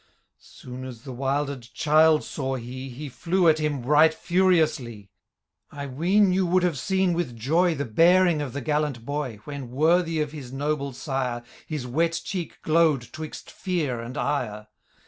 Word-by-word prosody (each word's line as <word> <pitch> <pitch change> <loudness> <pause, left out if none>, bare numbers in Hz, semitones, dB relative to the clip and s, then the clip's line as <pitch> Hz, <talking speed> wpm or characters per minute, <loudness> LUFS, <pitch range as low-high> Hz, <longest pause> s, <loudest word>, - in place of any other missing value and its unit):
Soon 125 +1 -10
as 125 -3 -9
the 130 - -7
wilder'd 135 +1 -1
child 155 0 +4
saw 135 -2 -3
he. 130 +2 -7
He 140 +4 -7
flew 175 +6 0
at 155 -1 +5
him 150 -4 -1
right 150 +4 +5
furiouslie. 160 - +1 0.6
I 140 0 -6
ween 180 +9 +2
you 185 -1 +1
would 180 +1 +2
have 170 -7 0
seen 190 -2 +1
with 165 -9 -3
joy 165 +9 +2
The 140 0 -3
bearing 170 +6 +4
of 135 -4 -4
the 140 - -4
gallant 150 -4 -1
boy. 140 -7 -4
When, 140 -2 -7
worthy 165 +5 +2
of 150 -1 -1
his 140 -5 -9
noble 140 0 -2
sire. 125 -3 -3 0.2
His 150 -5 -4
wet 165 +7 0
cheek 180 -4 -5
glow'd 155 -6 +2
twixt 155 0 -8
fear 160 -10 -2
and 120 +4 -7
ire 110 -7 -2
150 Hz, 165 wpm, -25 LUFS, 130-165 Hz, 0.6 s, at